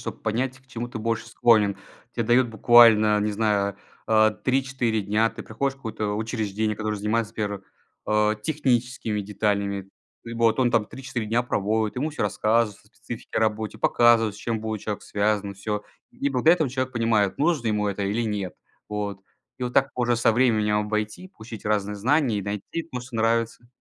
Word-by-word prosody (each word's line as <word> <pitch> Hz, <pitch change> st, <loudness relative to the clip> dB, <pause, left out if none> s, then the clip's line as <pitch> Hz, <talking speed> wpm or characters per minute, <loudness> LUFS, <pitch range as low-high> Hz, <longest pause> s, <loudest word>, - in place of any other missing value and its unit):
чтобы -, -, -6 dB
понять, 125 Hz, +4 st, -2 dB
к 130 Hz, -, -28 dB
чему 120 Hz, -2 st, -5 dB
ты 120 Hz, -1 st, -6 dB
больше 115 Hz, +1 st, -2 dB
склонен. 110 Hz, -4 st, +3 dB, 0.4 s
Те 115 Hz, -, -2 dB
дают 120 Hz, +2 st, +3 dB
буквально, 110 Hz, -2 st, +6 dB
не 105 Hz, +1 st, 0 dB
знаю, 100 Hz, -2 st, 0 dB, 0.3 s
а, 110 Hz, -1 st, +5 dB
3-4 130 Hz, -2 st, 0 dB
дня. 105 Hz, +3 st, +1 dB
Ты -, -, -9 dB
приходишь 135 Hz, +5 st, -2 dB
в -, -, -24 dB
какое-то 110 Hz, -5 st, -3 dB
учреждение, 110 Hz, -1 st, -2 dB
которое 110 Hz, 0 st, -2 dB
занимается, 105 Hz, +2 st, -1 dB
например, 105 Hz, -2 st, -3 dB, 0.4 s
а, 105 Hz, 0 st, +2 dB
техническими 125 Hz, -3 st, -1 dB
деталями. 100 Hz, -1 st, -1 dB, 0.5 s
Вот, 115 Hz, 0 st, +2 dB
он 125 Hz, -2 st, +2 dB
там 110 Hz, -, +3 dB
3-4 120 Hz, -1 st, -5 dB
дня 115 Hz, +3 st, +1 dB
проводит, 110 Hz, -1 st, 0 dB
ему 145 Hz, +5 st, -2 dB
всё 150 Hz, -, -4 dB
рассказывается 110 Hz, +1 st, +1 dB
о -, -, -24 dB
специфике -, -, -6 dB
работе, 110 Hz, 0 st, -1 dB
показывает, 115 Hz, -2 st, +4 dB
с 105 Hz, -, -12 dB
чем 115 Hz, -1 st, -2 dB
будет 110 Hz, -2 st, -4 dB
человек 105 Hz, -2 st, -4 dB
связан, 100 Hz, -1 st, -1 dB
всё. 105 Hz, +1 st, -4 dB, 0.3 s
И 255 Hz, +4 st, -2 dB
благодаря 165 Hz, +2 st, +4 dB
этому 160 Hz, -5 st, 0 dB
человек 130 Hz, 0 st, -2 dB
понимает, 115 Hz, -4 st, +1 dB
нужно 150 Hz, -6 st, +1 dB
ему 105 Hz, -1 st, 0 dB
это 100 Hz, 0 st, -2 dB
или 105 Hz, +4 st, 0 dB
нет, 100 Hz, -6 st, -3 dB, 0.3 s
вот. 105 Hz, -2 st, -4 dB, 0.4 s
И -, -, -8 dB
вот 125 Hz, -, -3 dB
так 135 Hz, 0 st, +3 dB
уже 120 Hz, -1 st, +2 dB
со 115 Hz, 0 st, +3 dB
временем 110 Hz, -3 st, +2 dB
обойти, 105 Hz, -, -3 dB
получить 110 Hz, -, -11 dB
разные 105 Hz, -1 st, 0 dB
знания 125 Hz, 0 st, +2 dB
и -, -, -3 dB
найти 105 Hz, -, -4 dB
то, 125 Hz, -, -3 dB
что 125 Hz, -1 st, -8 dB
нравится. 115 Hz, +1 st, 0 dB
110 Hz, 180 wpm, -25 LUFS, 105-120 Hz, 0.5 s, буквально